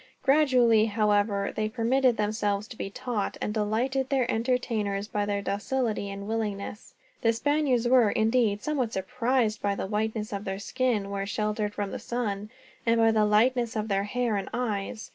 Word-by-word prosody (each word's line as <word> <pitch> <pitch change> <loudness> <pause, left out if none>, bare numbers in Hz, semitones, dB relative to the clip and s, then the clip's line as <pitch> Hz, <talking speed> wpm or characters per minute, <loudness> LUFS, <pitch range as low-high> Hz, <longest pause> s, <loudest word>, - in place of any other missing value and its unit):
Gradually, 250 -6 +4
however, 205 -2 +1
they 215 0 -1
permitted 245 +2 +2
themselves 210 -1 -1
to 240 - -8
be 195 - -5
taught, 215 0 -3
and 210 - -2
delighted 240 +5 0
their 265 -3 +2
entertainers 225 -4 -1
by 205 -1 -2
their 200 -1 -1
docility 210 0 -1
and 200 0 -6
willingness. 210 -2 -4 0.3
The 230 - +4
Spaniards 265 -1 +1
were, 245 -3 +5
indeed, 220 -1 +1
somewhat 265 -7 -1
surprised 235 +2 0
by 200 -1 0
the - - -3
whiteness 215 +1 -2
of 200 0 -3
their 195 -2 -3
skin, 220 -2 -1
where 200 0 -3
sheltered 210 0 -2
from 200 -1 -3
the - - -5
sun; 215 -4 -3 0.3
and 230 0 +2
by 225 0 +5
the 215 -1 +3
lightness 230 +3 +2
of 215 0 -2
their 195 0 +1
hair 235 0 0
and 195 - -4
eyes. 220 -2 -3
220 Hz, 170 wpm, -27 LUFS, 205-245 Hz, 0.3 s, were